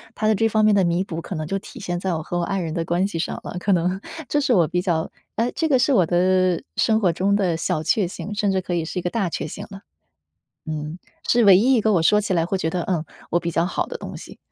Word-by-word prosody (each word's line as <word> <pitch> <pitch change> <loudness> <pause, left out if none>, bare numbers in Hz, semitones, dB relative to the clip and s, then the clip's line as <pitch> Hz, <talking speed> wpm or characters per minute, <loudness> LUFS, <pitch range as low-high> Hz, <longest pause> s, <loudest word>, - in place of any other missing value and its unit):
它 215 - 0
的 215 - +4
这 225 +2 +2
方 215 0 +3
面 215 -1 +5
的 195 - +4
弥 170 +1 +1
补， 165 -3 -5
可 190 - -7
能 155 -1 -4
就 195 - -1
体 250 +6 -11
现 175 -4 -3
在 185 +1 -2
我 160 - -2
和 175 - -3
我 - - 0
爱 195 +3 -1
人 165 -3 -3
的 165 -1 -1
关 175 +3 0
系 200 - -5
上 165 - -3
了， - - -6
可 200 - 0
能 180 +1 +1 0.3
这 295 - +1
是 275 -3 +2
我 175 -7 +4
比 180 - -1
较 170 -4 -1 0.3
诶， 230 +2 +1
这 320 - 0
个 265 -3 +4
是 270 +3 +3
我 185 -8 +4
的 185 +1 +2
生 220 -1 +3
活 185 -6 +2
中 200 +4 +1
的 185 -5 +1
小 155 -1 -1
确 200 +5 +2
幸， 200 +4 -6
甚 205 -1 +1
至 190 - +1
可 180 -1 -4
以 170 -2 0
是 165 +3 -4
一 - - -3
个 175 - -1
大 195 -3 -1
确 160 - -4
幸 200 +6 -7
了。 195 - -8 0.9
嗯， 155 +1 -4 0.3
是 235 -1 +4
唯 195 -3 +8
一 245 +8 +4
一 240 - +3
个 215 0 +2
我 175 -5 +3
说 210 +5 +4
起 205 -2 -1
来 165 -2 +2
会 190 +3 -1
觉 160 - -1
得 175 +1 -2
嗯， 170 -4 -1 0.3
我 175 - +3
比 170 0 -2
较 165 +1 +2
好 180 - -1
的 - - -5
东 - - -8
西。 - - -11
185 Hz, 315 characters per minute, -22 LUFS, 170-210 Hz, 0.9 s, 唯